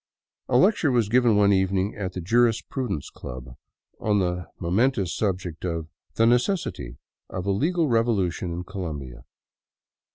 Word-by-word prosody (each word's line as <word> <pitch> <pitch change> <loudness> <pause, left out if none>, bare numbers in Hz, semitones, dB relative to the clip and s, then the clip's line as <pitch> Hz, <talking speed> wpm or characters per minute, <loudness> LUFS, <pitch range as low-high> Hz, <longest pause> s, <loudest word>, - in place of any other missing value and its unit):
A 125 - +4
lecture 180 - +4
was 120 -5 +2
given 120 -1 +4
one 100 -1 +5
evening 95 +1 +1
at 95 -3 -4
the 90 - -4
Jurisprudence 115 - 0
Club 65 0 -9 0.4
on 105 -1 +1
the 90 -2 -1
momentuous 100 +2 +1
subject 90 -5 -2
of 85 -3 -3
" - - -46
The 115 - +3
Necessity 120 - 0 0.3
of 90 -1 -5
a 100 - +1
Legal 160 - +1
Revolution 105 -8 +1
in 85 +1 -4
Colombia.' 75 - -6
100 Hz, 140 wpm, -25 LUFS, 90-120 Hz, 0.4 s, one